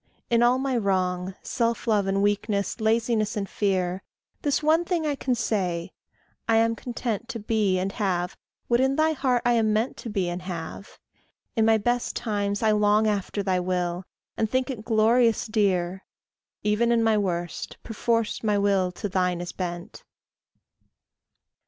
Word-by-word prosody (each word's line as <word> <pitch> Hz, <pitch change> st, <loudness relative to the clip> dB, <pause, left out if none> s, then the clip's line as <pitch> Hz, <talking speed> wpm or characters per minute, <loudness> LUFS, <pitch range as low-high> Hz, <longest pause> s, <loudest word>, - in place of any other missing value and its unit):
In 235 Hz, 0 st, +4 dB
all 240 Hz, +1 st, +4 dB
my 265 Hz, -1 st, -1 dB
wrong, 185 Hz, -3 st, 0 dB
Self 230 Hz, -1 st, -1 dB
love 210 Hz, -4 st, +2 dB
and 195 Hz, +1 st, +1 dB
weakness, 205 Hz, +1 st, 0 dB
laziness 220 Hz, -1 st, +1 dB
and 200 Hz, -1 st, -2 dB
fear, 185 Hz, -3 st, -1 dB, 0.4 s
This 290 Hz, +1 st, 0 dB
one 320 Hz, +3 st, +4 dB
thing 340 Hz, -2 st, -1 dB
I 295 Hz, -, +1 dB
can 265 Hz, -2 st, -1 dB
say: 185 Hz, -6 st, -1 dB, 0.6 s
I 225 Hz, -, +5 dB
am 230 Hz, 0 st, +3 dB
content 235 Hz, -2 st, -4 dB
To 230 Hz, -, -4 dB
be 210 Hz, -3 st, +1 dB
and 190 Hz, +2 st, -1 dB
have 180 Hz, -4 st, -1 dB, 0.3 s
what 240 Hz, 0 st, +3 dB
in 265 Hz, +1 st, +2 dB
thy 315 Hz, +1 st, +3 dB
heart 260 Hz, -5 st, 0 dB
I 240 Hz, -, +4 dB
am 220 Hz, -2 st, +2 dB
meant 220 Hz, +4 st, 0 dB
To 235 Hz, -, -7 dB
be 195 Hz, -4 st, -1 dB
and 175 Hz, +1 st, -3 dB
have. 180 Hz, +2 st, -7 dB, 0.6 s
In 225 Hz, -2 st, +3 dB
my 225 Hz, 0 st, +5 dB
best 240 Hz, +3 st, -1 dB
times 205 Hz, -2 st, -1 dB
I 220 Hz, -, +4 dB
long 210 Hz, +1 st, +3 dB
After 205 Hz, -1 st, -1 dB
thy 185 Hz, -2 st, +1 dB
will, 180 Hz, 0 st, -1 dB, 0.3 s
and 220 Hz, -, 0 dB
think 260 Hz, +2 st, 0 dB
it 225 Hz, -5 st, -7 dB
glorious 230 Hz, +1 st, +3 dB
dear; 190 Hz, -4 st, 0 dB, 0.6 s
Even 210 Hz, +3 st, +2 dB
in 230 Hz, -1 st, +3 dB
my 225 Hz, -1 st, +3 dB
worst, 175 Hz, -4 st, -2 dB
perforce 230 Hz, 0 st, -1 dB
my 210 Hz, -2 st, +1 dB
will 195 Hz, -2 st, +2 dB
to 205 Hz, -, -4 dB
thine 180 Hz, -2 st, 0 dB
is 175 Hz, 0 st, -5 dB
bent. 175 Hz, -1 st, -6 dB
210 Hz, 165 wpm, -25 LUFS, 190-235 Hz, 0.6 s, I